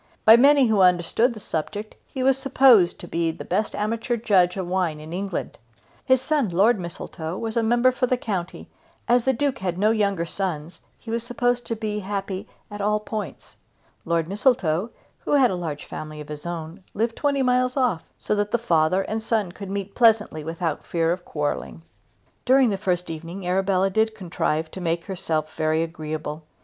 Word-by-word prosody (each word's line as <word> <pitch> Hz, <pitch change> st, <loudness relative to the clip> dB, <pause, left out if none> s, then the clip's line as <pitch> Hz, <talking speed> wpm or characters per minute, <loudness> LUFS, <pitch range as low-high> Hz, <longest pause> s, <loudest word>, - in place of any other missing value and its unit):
By 220 Hz, -, +10 dB
many 280 Hz, +2 st, +6 dB
who 215 Hz, -4 st, +3 dB
understood 185 Hz, +7 st, +3 dB
the -, -, -8 dB
subject 205 Hz, +5 st, -4 dB
he 260 Hz, -, -4 dB
was 265 Hz, 0 st, +4 dB
supposed 265 Hz, -8 st, +4 dB
to 175 Hz, -, -8 dB
be 165 Hz, -1 st, 0 dB
the 160 Hz, -, -6 dB
best 205 Hz, +4 st, -1 dB
amateur 230 Hz, +3 st, -1 dB
judge 190 Hz, -5 st, +3 dB
of 190 Hz, -, -2 dB
wine 180 Hz, -4 st, -1 dB
in 155 Hz, +2 st, -9 dB
England. 195 Hz, 0 st, -4 dB, 0.4 s
His 260 Hz, 0 st, +3 dB
son 290 Hz, -6 st, +1 dB
Lord 200 Hz, +6 st, +3 dB
Mistletoe 170 Hz, -1 st, -6 dB
was 225 Hz, -1 st, -4 dB
member 240 Hz, +2 st, +3 dB
for 250 Hz, 0 st, 0 dB
the 255 Hz, -, +1 dB
county 190 Hz, -7 st, -4 dB, 0.4 s
and 240 Hz, -, +5 dB
as 245 Hz, -, +1 dB
the 265 Hz, -, +4 dB
Duke 270 Hz, 0 st, -1 dB
had 180 Hz, -2 st, -2 dB
no 210 Hz, +3 st, +3 dB
younger 200 Hz, -6 st, +1 dB
sons 170 Hz, -3 st, -4 dB, 0.2 s
he 225 Hz, -, -9 dB
was 230 Hz, 0 st, -1 dB
supposed 245 Hz, 0 st, 0 dB
to 230 Hz, -, -2 dB
be 210 Hz, -1 st, -3 dB
happy 195 Hz, 0 st, -4 dB, 0.2 s
at 205 Hz, 0 st, -6 dB
all 210 Hz, +1 st, +1 dB
points. 210 Hz, -7 st, -7 dB, 0.5 s
Lord 165 Hz, -1 st, 0 dB
Mistletoe, 200 Hz, -3 st, +1 dB, 0.3 s
who -, -, -3 dB
had 265 Hz, -5 st, +5 dB
a -, -, -1 dB
large 160 Hz, -5 st, -5 dB
family 155 Hz, 0 st, -7 dB
of 150 Hz, -, -9 dB
his 150 Hz, +2 st, -7 dB
own, 170 Hz, +2 st, -6 dB
lived 230 Hz, +2 st, 0 dB
twenty 280 Hz, -2 st, +1 dB
miles 255 Hz, +1 st, +1 dB
off, 245 Hz, -11 st, +1 dB, 0.2 s
so -, -, -2 dB
that 205 Hz, 0 st, 0 dB
the 235 Hz, -, +2 dB
father 185 Hz, -4 st, +2 dB
and 220 Hz, +2 st, -3 dB
son 220 Hz, -5 st, 0 dB
could 195 Hz, +1 st, -9 dB
meet 200 Hz, 0 st, -4 dB
pleasantly 220 Hz, -9 st, +3 dB
without 165 Hz, +1 st, -3 dB
fear 165 Hz, -1 st, 0 dB
of 175 Hz, +1 st, -3 dB
quarrelling. 150 Hz, +2 st, -3 dB, 0.6 s
During 260 Hz, -2 st, +4 dB
the -, -, 0 dB
first 180 Hz, -3 st, -1 dB
evening 170 Hz, +4 st, -7 dB
Arabella 190 Hz, +1 st, +1 dB
did 220 Hz, +2 st, +1 dB
contrive 165 Hz, -5 st, -2 dB
to 190 Hz, -, -7 dB
make 170 Hz, -1 st, -1 dB
herself 160 Hz, -5 st, -2 dB
very 155 Hz, 0 st, +1 dB
agreeable. 155 Hz, -2 st, -5 dB
195 Hz, 190 wpm, -24 LUFS, 170-230 Hz, 0.6 s, By